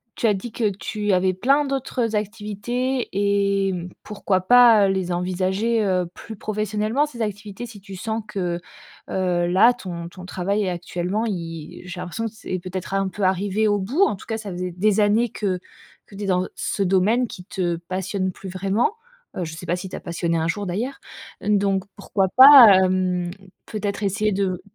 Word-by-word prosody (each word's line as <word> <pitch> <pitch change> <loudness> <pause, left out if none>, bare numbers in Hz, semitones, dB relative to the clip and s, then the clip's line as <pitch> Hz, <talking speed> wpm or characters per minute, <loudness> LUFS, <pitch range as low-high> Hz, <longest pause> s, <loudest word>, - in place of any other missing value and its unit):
tu - - -2
as 210 - +4
dit 200 +4 -5
que 220 -1 0
tu 205 +1 -2
avais 185 0 +2
plein 275 +10 +2
d'autres 255 -4 -2
activités 225 +5 -2
et 200 0 +1
mmh, 175 0 -5
pourquoi 200 -2 -1
pas 230 -1 +7
les 190 -2 -1
envisager, 190 +6 0
heu, 185 -2 +1
plus 220 - -9
professionnellement 215 +5 -1
ces 245 -6 -8
activités? 210 +1 -4
Si 215 -3 -12
tu 195 0 -10
sens 220 +3 -3
que, 180 -4 -2 0.5
heu, 180 -2 0
là, 200 +8 +5
ton 170 -7 -7
ton 180 +1 -11
travail 195 +3 -1
est 190 - -1
actuellement, 180 +4 -2
i 165 -6 -6
j'ai 180 0 -7
l'impression 185 +6 -4
que 225 - -3
c'est 185 -4 -5
peut-être 185 +1 -6
un 195 0 +1
peu 195 +2 -5
arrivé 200 +3 +1
au 205 - +2
bout. 225 - -1
En 305 - +2
tout 190 - -13
cas, 225 -1 -3
ça 210 -3 -7
faisait 180 0 -4
des 205 +4 +1
années 215 +3 +3
que 190 -4 -2 0.5
que 200 - -14
tu 205 - -6
es - - -2
dans 185 -1 +1
ce 200 - -3
domaine 195 +7 +2
qui 185 -5 -10
te 175 -3 -1
passionne 185 0 -2
plus 190 +1 -9
vraiment, 195 - 0 0.4
heu, 180 - -1
je 160 - -7
sais 175 - -9
pas 175 - +1
s'il 185 +1 -7
t'a - - -5
passionné 170 -1 -1
un 160 - 0
jour 205 +4 -2
d'ailleurs! 220 +10 -3 0.4
Donc, 200 -2 +1
pourquoi 195 -2 0
pas, 255 -7 +10
hem, 185 -1 0 0.4
peut-être 210 -1 -3
essayer 205 +2 +1
de 190 -2 -1
195 Hz, 190 wpm, -23 LUFS, 185-215 Hz, 0.5 s, pas